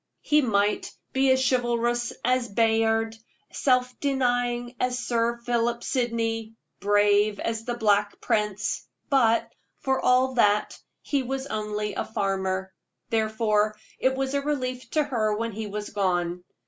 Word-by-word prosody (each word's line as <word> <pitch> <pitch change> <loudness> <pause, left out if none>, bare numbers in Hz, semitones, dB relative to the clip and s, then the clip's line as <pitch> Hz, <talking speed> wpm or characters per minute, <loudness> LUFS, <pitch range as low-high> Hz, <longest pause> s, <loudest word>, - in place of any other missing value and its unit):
He 300 0 +4
might 210 -4 +1 0.2
be 270 0 +3
as 260 0 +3
chivalrous 240 -1 +1
as 250 -1 +2
Bayard, 225 +1 +2 0.4
self 250 -2 +1
denying 245 -3 0
as 250 0 0
Sir 235 -1 0
Philip 235 0 0
Sydney, 225 -3 -1 0.2
brave 205 0 +3
as 225 0 -3
the 240 - -2
Black 205 -3 +1
Prince, 210 -1 -1 0.2
but, 230 -4 +3 0.3
for 265 0 0
all 255 +1 +3
that, 210 -3 +2 0.3
he 280 -2 0
was 265 +1 -3
only 210 -3 -3
a - - -2
farmer. 190 -2 -2 0.4
Therefore 215 -1 +1 0.2
it 260 0 +2
was 270 0 -2
a 280 - +1
relief 255 -3 -3
to 305 - +2
her 220 -7 0
when 230 +1 -2
he 215 +1 -5
was 210 +1 -5
gone. 180 -2 -1
230 Hz, 135 wpm, -26 LUFS, 210-250 Hz, 0.4 s, He